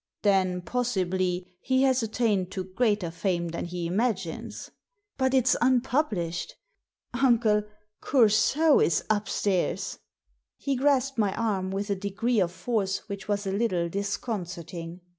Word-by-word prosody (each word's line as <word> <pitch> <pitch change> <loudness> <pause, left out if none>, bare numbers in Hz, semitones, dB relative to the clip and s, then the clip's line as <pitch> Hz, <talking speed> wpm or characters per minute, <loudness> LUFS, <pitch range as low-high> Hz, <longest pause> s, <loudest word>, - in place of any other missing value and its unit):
Then, 185 -3 +2
possibly, 185 -6 -1 0.2
he 260 0 +2
has 260 -1 +3
attained 215 -4 0
to 190 - -3
greater 195 -2 0
fame 170 0 -1
than 170 - -4
he 175 0 -4
imagines." 190 -2 -2 0.4
"But 260 0 +1
it's 255 -1 +4
unpublished 245 - 0 0.6
Uncle, 235 -5 +3 0.4
Coursault 260 +5 +4
is 170 - +2
up 205 -2 0
stairs!" 190 -3 -1 0.3
« - - -48
He 280 -1 -1
grasped 270 -1 +1
my 205 -3 +1
arm 200 -5 -1
with 200 +2 -3
a - - +2
degree 205 +4 -1
of 175 -3 +1
force 195 +2 -2
which 200 0 -6
was 205 -1 -1
a 195 - -1
little 190 -5 0
disconcerting. 180 -4 -4
205 Hz, 135 wpm, -27 LUFS, 185-245 Hz, 0.6 s, it's